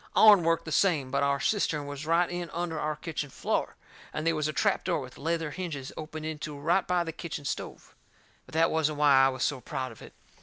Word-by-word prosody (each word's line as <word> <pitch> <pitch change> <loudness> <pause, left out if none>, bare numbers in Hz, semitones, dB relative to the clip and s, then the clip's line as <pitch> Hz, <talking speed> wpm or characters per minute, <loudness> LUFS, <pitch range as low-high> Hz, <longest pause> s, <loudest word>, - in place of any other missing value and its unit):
Ourn 210 -5 +8
worked 165 0 +1
the 160 - -6
same, 150 -7 +2
but 140 - +1
our 140 0 +2
cistern 155 -6 0
was 145 +1 -6
right 170 +2 +3
in 175 -1 -4
under 170 -2 -2
our 155 0 -1
kitchen 155 -2 -4
floor, - - -2 0.4
and 155 - -4
they 165 - +3
was 155 -1 0
a - - -1
trap 200 +5 +1
door 180 - 0
with 130 -1 -9
leather 165 0 -1
hinges 150 -7 -5
opened 155 0 -6
into 150 -1 -5
it - - -11
right 175 +5 +2
by 180 -1 +2
the 165 - -4
kitchen 155 -3 -6
stove. 140 - -5 0.5
But - - -16
that 165 +1 +3
wasn't 155 -2 +1
why 140 -3 +6
I 135 - +5
was 130 -1 -3
so 140 -4 0
proud 130 +1 -4
of 115 - -14
it. - - -12
155 Hz, 235 wpm, -29 LUFS, 145-170 Hz, 0.5 s, Ourn